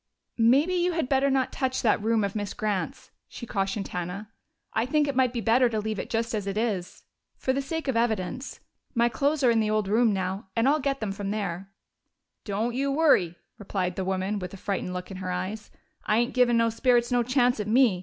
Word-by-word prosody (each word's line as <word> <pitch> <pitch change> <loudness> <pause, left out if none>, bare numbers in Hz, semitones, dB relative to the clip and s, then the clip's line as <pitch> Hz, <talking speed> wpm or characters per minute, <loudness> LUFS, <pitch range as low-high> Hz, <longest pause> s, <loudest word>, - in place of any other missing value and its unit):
"Maybe 270 +10 +4
you 355 0 +1
had 325 -5 -1
better 275 0 +3
not 265 -1 +1
touch 260 -1 -1
that 220 -3 +3
room 220 0 +2
of 200 0 -2
Miss 205 -2 -3
Grant's," 210 -5 -3 0.2
she 235 - -8
cautioned 195 -1 -2
Hannah. 180 +4 -5 0.4
"I 225 +2 0
think 295 +2 +2
it 280 - -2
might 255 -2 +3
be 240 -2 -3
better 240 +3 +4
to 220 -2 -1
leave 215 0 -3
it - - -5
just 230 0 -1
as 205 -2 -2
it 195 +1 -2
is 205 -6 -2 0.3
for 260 - 0
the 275 - 0
sake 320 +3 -4
of 265 - 0
evidence. 230 +2 -1 0.3
My 235 0 +3
clothes 285 +4 0
are 245 - +6
in 225 -1 +3
your 215 0 +1
old 215 -2 0
room 225 +2 +3
now, 190 0 -3
and 230 +2 +2
I'll 300 +2 +3
get 275 -1 -1
them 215 -2 -2
from 195 0 -4
there." 195 -3 -3 0.8
"Don't 220 +4 -1
you 275 +2 0
worry!" 275 - +3 0.2
returned 190 -3 -2
the 190 - -2
woman, 190 +2 -1
with 180 0 -6
a - - -10
frightened 190 -1 -3
look 180 +1 -6
in 190 - -6
her 185 -1 -5
eyes. 190 +4 -4 0.3
"I 215 - +1
ain't 240 +1 +1
givin' 245 -2 +4
no 230 0 +3
spirits 240 +1 +2
no 245 -1 +3
chance 245 0 +2
at 210 - -3
me! 225 -4 +4
225 Hz, 225 wpm, -26 LUFS, 195-255 Hz, 0.8 s, are